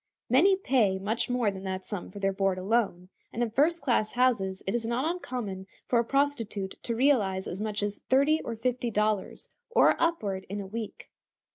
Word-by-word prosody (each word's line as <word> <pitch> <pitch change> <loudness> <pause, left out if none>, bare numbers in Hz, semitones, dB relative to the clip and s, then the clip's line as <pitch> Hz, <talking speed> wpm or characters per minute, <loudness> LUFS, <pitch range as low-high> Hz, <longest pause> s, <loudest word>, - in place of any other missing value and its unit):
Many 365 +10 +6
pay 245 - +2
much 215 +6 -1
more 245 -4 +1
than 190 -1 -8
that 190 0 -4
sum 205 -5 -5
for 195 - -11
their 195 -1 0
board 195 -1 +1
alone, 190 -2 0 0.2
and 240 - -1
in 230 - -2
first 305 +7 +2
class 235 -5 +1
houses 220 -7 +1
it 195 - -1
is 240 -1 -1
not 235 +4 -1
uncommon 245 - -4 0.2
for 240 - +2
a - - +3
prostitute 230 -7 -1
to 230 - -3
realize 220 -8 +2
as 190 - -5
much 210 -1 -2
as 205 0 -2
thirty 280 +4 +4
or 230 - -5
fifty 245 +1 -1
dollars, 210 -2 -1 0.2
or 470 - +5
upward, 210 - 0
in 200 +1 -4
a 200 - -5
week. 215 +2 -6
225 Hz, 190 wpm, -28 LUFS, 195-255 Hz, 0.2 s, Many